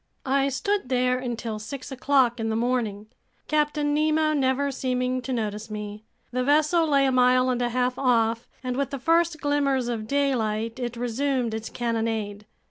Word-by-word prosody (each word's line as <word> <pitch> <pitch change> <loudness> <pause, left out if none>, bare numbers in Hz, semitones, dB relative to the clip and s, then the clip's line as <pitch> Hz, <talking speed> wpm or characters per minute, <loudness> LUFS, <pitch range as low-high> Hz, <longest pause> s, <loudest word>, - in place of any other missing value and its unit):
I 275 +1 +2
stood 390 +3 -1
there 250 0 +2
until 235 -3 -4
six 255 +5 -7
o'clock 260 -2 +2
in 225 0 -1
the 220 - -1
morning, 230 -3 -1 0.4
Captain 295 -1 +1
Nemo 310 +1 +2
never 275 0 +1
seeming 255 -1 -1
to 260 - -5
notice 215 -2 -3
me. 210 0 -6 0.3
The 255 +1 0
vessel 305 +4 +3
lay 280 -2 +3
a 265 - +2
mile 255 0 +4
and 245 -1 -1
a 240 - +1
half 250 +1 0
off, 230 -3 +2 0.2
and 250 -1 -2
with 280 -2 0
the 275 - -4
first 330 +3 +2
glimmers 275 -4 +1
of 220 -2 -3
daylight, 230 -4 0
it 240 -1 -4
resumed 245 0 -1
its 220 0 -4
cannonade. 225 -3 -2
255 Hz, 170 wpm, -25 LUFS, 230-280 Hz, 0.4 s, mile